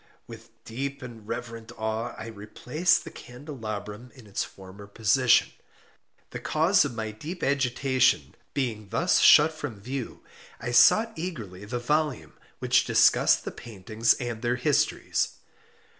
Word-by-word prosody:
With 115 0 -12
deep 140 +4 -5
and 115 -4 -11
reverent 115 -1 -6
awe 110 +2 -3
I - - -7
replaced 115 - -1
the - - -9
candelabrum 120 -4 -8
in 125 -4 -15
its 100 - -3
former 95 +1 -12
position. 115 +4 +3 0.8
The - - -6
cause - - +3
of 120 - -4
my 110 -1 -4
deep 160 - -8
agitation 130 -1 +1 0.2
being 110 -7 -3
thus - - +2
shut 155 +2 +7
from 120 -9 -7
view, 125 +4 -6 0.4
I 120 - -4
sought 215 - +5
eagerly 110 - -6
the 120 +4 -4
volume 150 +3 -1 0.2
which - - +2
discussed - - +4
the - - -4
paintings 110 +1 -1
and 120 -3 -5
their 120 +1 0
histories. 140 +4 0
120 Hz, 135 wpm, -26 LUFS, 110-135 Hz, 0.8 s, shut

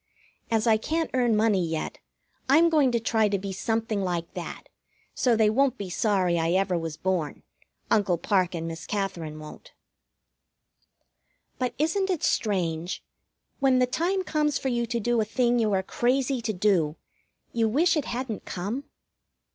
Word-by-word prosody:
As 225 -1 +1
I 220 -2 +5
can't 320 +8 -2
earn 245 -3 +2
money 210 -4 +3
yet, 160 -1 -3 0.5
I'm 325 +5 +6
going 295 -6 +3
to 235 - +1
try 220 -1 +2
to 200 - +1
be 195 0 -5
something 220 +1 -1
like 175 -3 -3
that, - - -6 0.5
so 245 -3 +2
they 220 -1 +4
won't 260 +4 +2
be 195 -3 -6
sorry 185 -4 +1
I 165 +1 +1
ever 190 -1 +2
was 165 -2 -3
born. 180 -5 -2 0.5
Uncle 195 -5 +3
Parke 185 0 +1
and 165 0 -3
Miss 165 0 -7
Katherine 175 -7 -3
won't. 155 - -11 1.9
But 250 -2 -1
isn't 380 +6 +1
it 360 -5 -1
strange, 175 -5 -1 0.6
when 270 -2 +4
the 255 - +4
time 355 +9 0
comes 300 -4 0
for 265 - -2
you 235 -1 0
to 235 +1 -1
do 235 +1 +1
a - - +2
thing 240 +2 +1
you 220 -2 +2
are 190 -1 +1
crazy 255 +4 0
to 225 -1 -1
do, 180 -6 +1 0.6
you 225 -1 +2
wish 320 +9 +3
it 300 - 0
hadn't 240 -3 -4
come? 210 +10 -4
220 Hz, 165 wpm, -26 LUFS, 185-255 Hz, 1.9 s, I'm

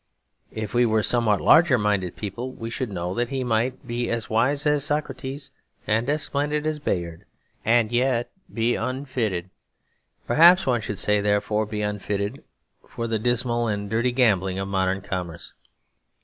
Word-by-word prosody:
If 110 -2 -4
we 120 0 +4
were 110 -2 +2
somewhat 115 -4 +3
larger 160 -6 +6
minded 100 -5 0
people, 120 +5 -5
we 115 -2 -7
should 125 -2 -3
know 90 -1 -3
that 120 +3 -1
he 135 -1 -2
might 125 +3 -1
be 120 0 -2
as 115 -1 -3
wise 130 +7 +2
as 150 -2 +2
Socrates 145 -2 -3 0.3
and 115 +5 0
as 150 +1 +1
splendid 150 +1 -1
as 155 -1 -1
Bayard 85 - -3 0.4
and 115 0 +3
yet 120 0 +1 0.2
be 115 +1 +1
unfitted, 120 -10 -3 0.7
perhaps 175 +4 +6
one 120 -3 +1
should 105 -2 -4
say 105 +1 +2
therefore 105 +1 0
be 105 -1 -3
unfitted, 105 +3 -3 0.4
for 115 - -5
the 115 -1 -1
dismal 120 0 0
and 105 -1 -3
dirty 120 +3 +1
gambling 100 -7 +2
of 95 0 -3
modern 95 0 0
commerce. 90 -4 -6
115 Hz, 160 wpm, -24 LUFS, 105-130 Hz, 0.7 s, larger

